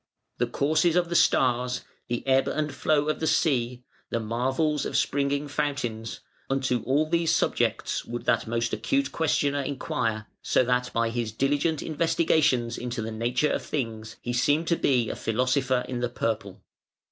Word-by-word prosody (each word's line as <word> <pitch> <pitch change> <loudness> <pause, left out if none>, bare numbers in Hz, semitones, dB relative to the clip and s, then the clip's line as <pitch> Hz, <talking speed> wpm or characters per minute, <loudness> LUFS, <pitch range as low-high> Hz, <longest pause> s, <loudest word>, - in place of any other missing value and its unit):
The 120 - +2
courses 155 +7 +2
of 175 -1 +2
the 170 - -2
stars, 125 -4 +3 0.3
the 120 0 -3
ebb 135 0 +3
and 150 -2 -1
flow 145 +2 +1
of 155 - 0
the 160 - -1
sea, 125 -5 +1 0.3
the 115 - -1
marvels 130 +7 0
of - - -1
springing 140 +1 0
fountains, 135 -6 -3 0.3
nto 130 -3 0
all 145 +4 +2
these 165 0 +1
subjects - - 0
would 120 +1 -6
that - - +2
most 115 0 -1
acute 275 0 0
questioner 145 -3 +1
inquire, 115 -5 -2 0.2
so - - +2
that 125 0 0
by 115 0 0
his 115 -2 -2
diligent 145 +6 0
investigations 155 -6 +1
into 120 -2 -4
the 110 - -4
nature 120 +6 0
of - - -1
things, 110 -5 -4
he 120 - -2
seemed 145 +7 +2
to 170 - +4
be 125 -7 +2
a - - -3
philosopher 130 +2 0
in 125 -1 -3
the 120 0 -1
purple". 110 -5 -3
130 Hz, 165 wpm, -26 LUFS, 120-150 Hz, 0.3 s, to